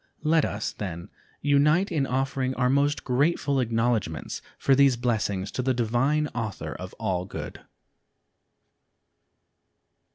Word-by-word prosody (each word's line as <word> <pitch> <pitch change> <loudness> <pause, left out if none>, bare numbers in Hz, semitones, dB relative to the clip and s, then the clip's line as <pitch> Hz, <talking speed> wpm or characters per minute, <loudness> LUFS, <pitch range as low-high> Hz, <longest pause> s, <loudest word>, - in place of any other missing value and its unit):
Let 160 0 +3
us, 105 +1 -3
then, 85 -4 -6 0.3
unite 150 +7 +3
in 145 -5 0
offering 130 0 -1
our 125 0 +2
most 140 +1 +1
grateful 140 +1 +1
acknowledgments 115 - -1 0.2
for 135 - +3
these 135 -2 +5
blessings 105 -5 -1
to - - -2
the 130 0 +1
Divine 125 +6 +1
Author 110 -5 -4
of - - -8
All 90 -2 -1
Good. - - -7
130 Hz, 120 wpm, -26 LUFS, 110-140 Hz, 0.3 s, these